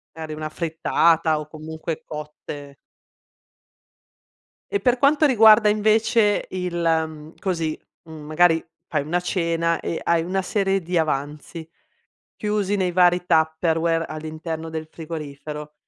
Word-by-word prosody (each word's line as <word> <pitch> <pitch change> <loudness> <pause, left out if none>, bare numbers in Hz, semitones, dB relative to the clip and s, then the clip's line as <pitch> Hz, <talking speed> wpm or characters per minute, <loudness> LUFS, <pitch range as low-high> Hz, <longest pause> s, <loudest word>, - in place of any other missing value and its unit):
Magari 160 -1 -6
una 155 0 -4
frittata 160 0 +1
o 150 - -7
comunque 160 +1 -6
cotte. 150 -2 -8 2.0
E 405 - +1
per 250 -1 +2
quanto 290 +3 +4
riguarda 220 -5 +6
invece 215 0 +2
il, 180 -1 -4
mhmm, 160 -2 -1
così, 165 -5 -2 0.3
mhmm, 155 -2 -9
magari 165 +1 +3 0.2
fai 150 -3 -1
una 175 +3 0
cena 170 -2 0
e 165 - -3
hai 170 -1 +2
una 190 +2 -1
serie 195 -1 0
di 175 +1 -2
avanzi, 155 +2 -3 0.7
chiusi 210 -1 -1
nei 185 -3 0
vari 180 0 +3
Tupperware 165 0 +1
all'interno 160 +1 -6
del 160 -1 -5
frigorifero, 150 -2 -7
165 Hz, 120 wpm, -23 LUFS, 155-185 Hz, 2.0 s, riguarda